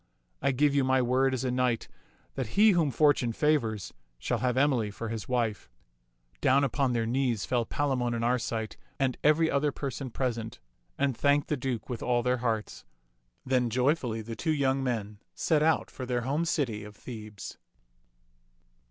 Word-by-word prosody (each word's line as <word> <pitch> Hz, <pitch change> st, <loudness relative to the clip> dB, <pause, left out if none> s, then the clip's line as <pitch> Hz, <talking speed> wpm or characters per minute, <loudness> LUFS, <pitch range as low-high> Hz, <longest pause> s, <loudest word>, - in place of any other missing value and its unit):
I 140 Hz, -, +2 dB
give 140 Hz, +2 st, +2 dB
you 140 Hz, -1 st, +3 dB
my 130 Hz, 0 st, +3 dB
word 130 Hz, +2 st, +2 dB
as 130 Hz, -1 st, -2 dB
a 130 Hz, -, 0 dB
knight 125 Hz, -2 st, 0 dB, 0.5 s
that 130 Hz, -, -5 dB
he 215 Hz, +1 st, +7 dB
whom 170 Hz, -5 st, +2 dB
fortune 135 Hz, -4 st, +3 dB
favors 115 Hz, -9 st, 0 dB, 0.2 s
shall 115 Hz, -, -2 dB
have 125 Hz, +1 st, 0 dB
Emily 130 Hz, -6 st, +2 dB
for 110 Hz, +2 st, -6 dB
his 110 Hz, -1 st, -5 dB
wife." 115 Hz, -, -1 dB, 0.7 s
Down 135 Hz, +2 st, +4 dB
upon 135 Hz, -1 st, +1 dB
their 115 Hz, -1 st, 0 dB
knees 120 Hz, -3 st, 0 dB
fell 120 Hz, -2 st, 0 dB
Palamon 125 Hz, -5 st, 0 dB
and 115 Hz, 0 st, -1 dB
Arcite 115 Hz, -2 st, -1 dB, 0.2 s
and 130 Hz, -2 st, +1 dB
every 155 Hz, +2 st, +4 dB
other 145 Hz, +1 st, +1 dB
person 135 Hz, -1 st, -5 dB
present, 115 Hz, -3 st, -3 dB, 0.4 s
and 140 Hz, -2 st, +1 dB
thanked 145 Hz, +3 st, +2 dB
the 150 Hz, -, +1 dB
Duke 125 Hz, -4 st, -3 dB
with 125 Hz, -3 st, -5 dB
all 120 Hz, -1 st, +1 dB
their 125 Hz, +1 st, +1 dB
hearts. 115 Hz, -3 st, -2 dB, 0.6 s
Then 125 Hz, -2 st, +1 dB
joyfully 125 Hz, -2 st, 0 dB
the 115 Hz, +1 st, -6 dB
two 160 Hz, +7 st, 0 dB
young 135 Hz, -1 st, +1 dB
men 105 Hz, -5 st, -3 dB, 0.2 s
set 155 Hz, -2 st, +2 dB
out 160 Hz, +1 st, +2 dB
for 130 Hz, -, -7 dB
their 125 Hz, -1 st, 0 dB
home 145 Hz, +7 st, -1 dB
city 125 Hz, -11 st, -1 dB
of 105 Hz, 0 st, -11 dB
Thebes. 110 Hz, -3 st, -9 dB
125 Hz, 170 wpm, -29 LUFS, 115-140 Hz, 0.7 s, he